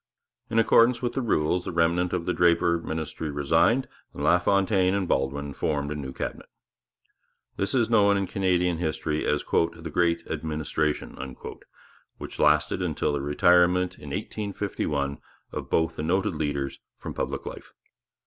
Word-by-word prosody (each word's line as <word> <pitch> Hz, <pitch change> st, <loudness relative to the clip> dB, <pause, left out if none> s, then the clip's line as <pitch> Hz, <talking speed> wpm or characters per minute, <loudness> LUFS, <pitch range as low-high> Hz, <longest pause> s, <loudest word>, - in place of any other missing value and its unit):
In 115 Hz, -, -1 dB
accordance 115 Hz, +2 st, +4 dB
with 120 Hz, -1 st, -1 dB
the 135 Hz, -, -1 dB
rules 90 Hz, -5 st, +1 dB
the -, -, -3 dB
remnant 85 Hz, +1 st, +1 dB
of 90 Hz, -2 st, -2 dB
the 90 Hz, -, 0 dB
Draper 85 Hz, 0 st, +3 dB
ministry 80 Hz, -1 st, -4 dB
resigned, 80 Hz, -, +2 dB, 0.3 s
and -, -, -5 dB
LaFontaine 95 Hz, +1 st, +3 dB
and 100 Hz, -2 st, -1 dB
Baldwin 70 Hz, +1 st, -1 dB
formed 70 Hz, -1 st, -2 dB
a -, -, -3 dB
new 70 Hz, -3 st, -5 dB
Cabinet. -, -, -6 dB, 1.1 s
This 100 Hz, +6 st, -1 dB
is 120 Hz, -3 st, +3 dB
known 100 Hz, -3 st, +4 dB
in 100 Hz, -, 0 dB
Canadian 90 Hz, -2 st, +1 dB
history 80 Hz, -2 st, -2 dB
as 75 Hz, -, +1 dB
the 85 Hz, -1 st, -1 dB
'Great 85 Hz, -1 st, +1 dB
Administration,' 75 Hz, -1 st, -2 dB, 1.0 s
which -, -, -9 dB
lasted 75 Hz, +4 st, +3 dB
until 80 Hz, -4 st, -1 dB
the 70 Hz, -, -1 dB
retirement 90 Hz, +5 st, +3 dB
in -, -, -9 dB
1851 85 Hz, -9 st, -3 dB, 0.3 s
of -, -, -6 dB
both 80 Hz, 0 st, +1 dB
the -, -, -2 dB
noted 90 Hz, +4 st, 0 dB
leaders 70 Hz, -3 st, -3 dB, 0.2 s
from -, -, -7 dB
public -, -, -3 dB
life. -, -, -8 dB
85 Hz, 150 wpm, -26 LUFS, 75-95 Hz, 1.1 s, accordance